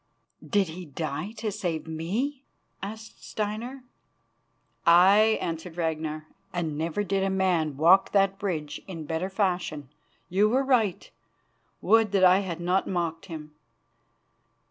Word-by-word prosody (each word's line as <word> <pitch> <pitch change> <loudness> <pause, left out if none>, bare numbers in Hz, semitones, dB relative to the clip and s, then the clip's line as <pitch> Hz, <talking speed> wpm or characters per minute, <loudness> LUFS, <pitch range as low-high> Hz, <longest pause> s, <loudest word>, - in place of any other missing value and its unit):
"Did 200 -5 +1
he 175 +3 -7
die 155 +6 -4
to 215 -2 -3
save 180 -6 -3
me?" 210 - -3 0.4
asked 220 +3 -8
Steinar. 225 +5 -4 1.0
"Aye," 195 +6 +6
answered 165 +1 -5
Ragnar, 155 -2 -2 0.3
"and 170 -5 -2
never 165 +6 -1
did 195 -1 0
man 175 -7 +1
walk 175 +6 +5
that 195 -1 +2
bridge 160 -7 -3
in 165 -5 -7
better 160 +5 -2
fashion. 180 - -1 0.4
You 200 +4 +3
were 260 +4 +2
right. 235 -8 +1 0.7
Would 225 -2 +3
that 195 -2 +3
I 185 +1 +7
had 180 -4 -4
not 180 +2 +1
mocked 170 0 -2
him." 155 -3 -8
185 Hz, 125 wpm, -27 LUFS, 160-205 Hz, 1.0 s, I